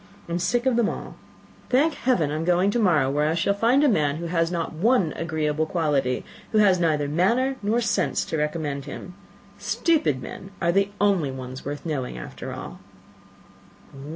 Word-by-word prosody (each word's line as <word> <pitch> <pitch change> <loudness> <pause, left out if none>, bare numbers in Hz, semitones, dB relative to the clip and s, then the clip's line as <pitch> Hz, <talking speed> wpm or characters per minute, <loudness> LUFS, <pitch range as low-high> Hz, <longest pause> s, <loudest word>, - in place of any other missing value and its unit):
I - - -8
am 170 - 0
sick 240 +8 0
of 255 -3 +2
them 235 -3 +3
all. - - -7 0.5
Thank 295 +5 +3
heaven! 180 - +1
I - - -2
am 155 - -2
going 180 +3 +3
to 240 - 0
morrow 165 - +3
where 150 +2 +1
I 160 - 0
shall 185 +4 +1
find 235 +7 +3
a - - +5
man 150 - +2
who 170 +2 -5
has 165 0 0
not 170 -2 -2
one 190 - +2
agreeable 155 -1 -1
quality, 145 -7 0 0.3
who 220 - +1
has 195 -4 +5
neither 155 -4 +1
manners 235 - +1
nor 220 +4 +1
sense 215 - 0
to 160 - -3
recommend 150 -2 -2
him. 165 +5 -8 0.5
Stupid 295 - +1
men 190 +8 -8
are 170 -1 +2
the 195 +2 +2
only 195 -8 +2
ones 130 -1 -7
worth 145 +3 -6
knowing, 135 - -3
after - - -7
all." - - -8
170 Hz, 185 wpm, -24 LUFS, 150-205 Hz, 0.5 s, a